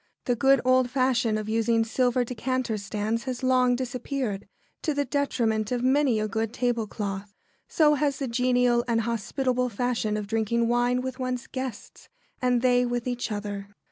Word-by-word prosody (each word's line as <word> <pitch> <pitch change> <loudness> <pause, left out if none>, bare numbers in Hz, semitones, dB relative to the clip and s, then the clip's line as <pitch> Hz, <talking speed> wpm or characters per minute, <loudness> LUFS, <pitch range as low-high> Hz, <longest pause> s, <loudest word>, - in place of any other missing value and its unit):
The 245 - +1
good 270 +1 +4
old 255 -1 +4
fashion 250 -4 +1
of 215 0 -4
using 225 +1 +2
silver 245 +2 +1
decanter 250 0 -2
stands 215 +3 -2
has 255 0 -4
long 255 -1 +3
disappeared, 250 -4 -3 0.3
to 305 - -1
the 285 0 0
detriment 230 -7 0
of 245 -1 -1
many 260 -3 +3
a 215 - 0
good 225 +1 -2
tablecloth. 210 -5 -2 0.3
So 300 -2 +4
has 285 -1 0
the 270 - -3
genial 245 0 +2
and 230 -1 +2
hospitable 250 +3 -1
fashion 225 -1 -1
of 210 - -3
drinking 225 +2 0
wine 245 +1 +2
with 260 0 -5
one's 255 -1 -2
guests, 260 -5 -7 0.3
and 250 -1 +2
they 250 -1 +4
with 245 -1 -2
each 245 -2 -2
other. 205 -1 -4
245 Hz, 165 wpm, -26 LUFS, 225-255 Hz, 0.3 s, good